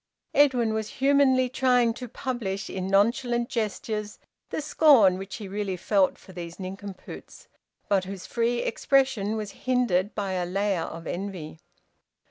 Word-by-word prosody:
Edwin 250 -6 +4
was 220 -1 -2
humanly 270 -2 +4
trying 250 -2 +2
to 250 +1 -7
publish 225 -6 -4
in 185 -1 -3
nonchalant 235 +4 +2
gestures 210 -1 -3 0.3
the - - -3
scorn 275 -11 +5
which 195 0 -7
he 210 -4 -7
really 195 -1 -3
felt 195 +1 +2
for 190 - -15
these 175 0 -8
nincompoops, 195 +1 -9 0.4
but 195 -2 +2
whose 190 -1 -7
free 235 0 0
expression 260 -5 +1
was 210 -2 -4 0.2
hindered 220 -7 +1
by 200 -2 -2
a 180 -1 -1
layer 195 -1 0
of 165 +1 -8
envy. 175 -4 -5
210 Hz, 140 wpm, -26 LUFS, 190-245 Hz, 0.4 s, scorn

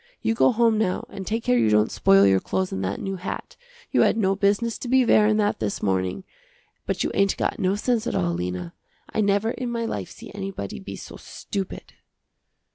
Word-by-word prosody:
You 225 - +2
go 225 - +4
home 230 -2 +3
now 190 -4 0
and 190 -1 -8
take 225 +1 -1
care 125 -1 +3
you 110 -2 +3
don't 105 0 +3
spoil 95 0 +5
your 95 -1 +4
clothes 190 - -2
and 95 - -3
that 95 +1 -2
new 195 0 -4
hat, 185 - -6 0.4
you - - +3
had - - +3
no 195 -3 +2
business 205 +4 +1
to - - -6
be 260 +1 +4
wearin' 215 -1 +4
that 210 -1 +1
this 105 -2 -3
morning, 95 - 0 0.6
but - - -1
you - - -1
ain't 195 0 +2
got - - -1
no 190 -1 +1
sense 230 +1 0
at - - -2
all, 85 -1 +1
Lena. 90 0 -4 0.4
I - - +1
never 205 +2 +2
in 250 -1 -4
my 235 -1 -2
life - - -4
see 230 -1 -11
anybody 195 - -5
be - - -8
so - - -10
stupid." 195 -2 -6
195 Hz, 210 wpm, -24 LUFS, -, 0.6 s, spoil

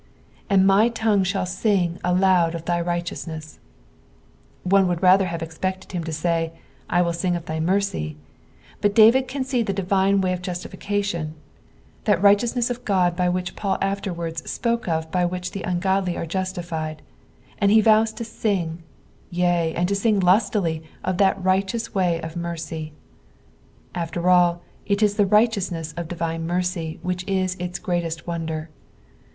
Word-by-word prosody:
" - - -31
And 195 -2 +5
my 200 +4 +5
tongue 220 -4 +1
ibnll 190 0 -1
sing 185 -2 0
aloud 180 -2 +3
of 165 0 -6
thy 175 0 0
rigMeovmeu." 170 -2 -4 1.0
One 190 +1 +4
would 175 0 -2
rather 185 +1 +6
have 170 -1 -4
eipected 185 +4 -4
him 175 -3 -3
to 165 - -4
say, 165 +1 -1 0.4
I 175 0 +3
will 170 -1 0
sing 175 +1 0
of 170 - -5
thy 160 0 -3
mercy; 165 - -1 0.6
but 205 0 +2
David 235 +4 +6
can 265 0 -3
aee 255 -3 0
the 200 - -2
divine 195 +1 +2
way 185 -1 +1
of 180 - -4
juatiflcation, 180 -2 -3 0.7
that 205 -6 +3
righteousness 230 +5 +3
of 245 0 -5
Qod 180 -2 +2
which 180 0 -3
Paul 195 -2 -1
afterwards 170 -5 -3
spoke 235 -2 -1
of 160 -1 -1
by 180 -1 +1
which 180 +1 -2
the 195 - -5
ungodly 185 0 0
are - - -3
justified, 170 -3 -4 0.6
and 200 - +3
he 220 +2 +6
vows 220 +1 +4
to 230 - -6
sing, 185 -7 -2 0.5
yea, 175 -2 +1
and 175 +1 +1
to 200 - 0
sing 210 0 +2
lustily 180 -3 +2 0.2
of 185 -1 -1
that 195 -1 +3
righteous 195 +5 0
way 180 -4 +1
of 160 0 -7
mercy. 165 -2 -5 1.0
After 170 0 -3
all, 175 -1 +4 0.2
it 200 +1 +1
is 205 -1 +3
the 205 -2 +4
righteousness 190 -7 +1
of 170 -1 -4
divine 165 -1 -3
mercy 175 -2 -2
which 180 0 -2
is 185 -1 0
ifs 180 +1 -3
greatest 170 -4 -3
wonder. 160 -2 -4
180 Hz, 160 wpm, -23 LUFS, 170-200 Hz, 1.0 s, rather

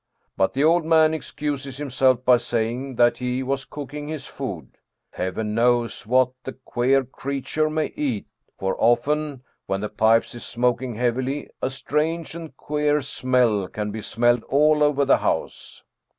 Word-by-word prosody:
But 95 - +1
the 140 - +2
old 165 +2 +4
man 160 -1 +4
excuses 145 -3 -4
himself 130 -3 +1
by 125 -1 +6
saying 120 +3 -2
that 120 0 +4
he 125 +1 -2
was 135 +1 -2
cooking 145 +1 -7
his 155 -3 -5
food. - - -7 0.4
Heaven 105 +4 -3
knows 120 -1 +1
what 130 +1 +3
the 130 - -6
queer 130 +1 +1
creature 140 +4 -2
may 155 0 -2
eat, 130 -9 -2 0.3
for 95 0 -1
often, 135 +4 +1 0.2
when 95 0 -1
the 105 - -3
pipe 110 +2 +4
is 120 - -8
smoking 125 0 -1
heavily, 125 +4 -1
a - - 0
strange 155 +5 -2
and 160 -4 -9
queer 150 0 0
smell 125 -7 +1
can 105 +1 -4
be 110 +1 -5
smelled 120 +2 +2
all 150 +2 +3
over 145 -1 +3
the 135 - +5
house." - - -3
130 Hz, 155 wpm, -23 LUFS, 120-150 Hz, 0.4 s, by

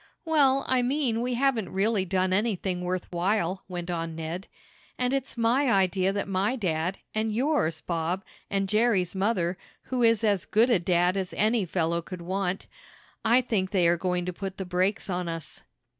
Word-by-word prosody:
"Well, 275 -4 +3
I 255 -1 +3
mean 245 -3 0
we 250 0 -1
haven't 245 -5 +1
really 200 0 +1
done 185 0 +1
anything 190 -3 0
worth 180 0 -2
while," 185 +1 0
went 175 -1 -5
on 165 -1 -3
Ned. 165 +5 -5 0.5
"And 250 +1 0
it's 270 -2 -2
my 240 +3 +3
idea 190 -1 +2
that 200 0 -2
my 195 +5 0
dad, 180 -4 -1 0.2
and 220 0 0
yours, 220 - 0
Bob, 170 +3 -2 0.3
and 195 0 0
Jerry's 210 -4 +2
mother, 190 -3 0 0.2
who 255 -1 -2
is 230 -2 +4
as 205 -4 +2
good 230 +4 +3
a 220 - +4
dad 175 +1 +2
as 190 -2 -3
any 215 0 +2
fellow 170 -1 0
could 175 +1 -8
want 190 +1 -2 0.6
I 235 +3 +5
think 205 -6 -1
they 185 -4 +3
are 170 - +4
going 180 0 -1
to 180 - -3
put 190 +1 -6
the 190 - -4
brakes 185 +4 0
on 180 -2 -2
us." 165 -1 -6
190 Hz, 180 wpm, -27 LUFS, 180-230 Hz, 0.6 s, I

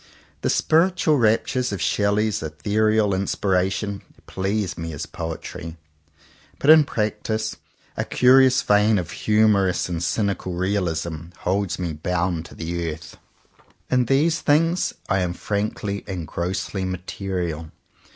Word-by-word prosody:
The - - 0
spiritual 160 -2 +3
raptures 120 +2 +1
of 100 - -3
Shelley's 105 0 +1
ethereal 105 +7 +1
in 95 +1 0
spiration 95 +1 0 0.2
please 95 0 -2
me 80 -1 -5
as 75 - -5
poetry, 80 0 -6 0.8
but 145 - +5
in 155 -2 +8
practice 110 -1 -2 0.4
a - - -1
curious 130 +1 +5
vein 105 +1 +4
of 90 - -3
humourous 105 -4 +2
and 85 -2 -3
cynical 100 0 -1
realism 85 -4 -2 0.2
holds 95 +1 0
me 85 -3 -3
bound 85 +1 -1
to - - -12
the 85 0 -3
earth. 80 +1 -10
61 - - -21
CONFESSIONS - - -37
OF - - -36
TWO - - -29
BROTHERS 125 - -1
In 125 - +2
these 155 +5 +2 0.5
things - - -11
I 95 - +1
am 90 -1 -1
frankly 100 +1 -3
and 90 -5 -4
grossly 95 +3 -3
material. 90 -3 -4
100 Hz, 140 wpm, -23 LUFS, 85-110 Hz, 0.8 s, in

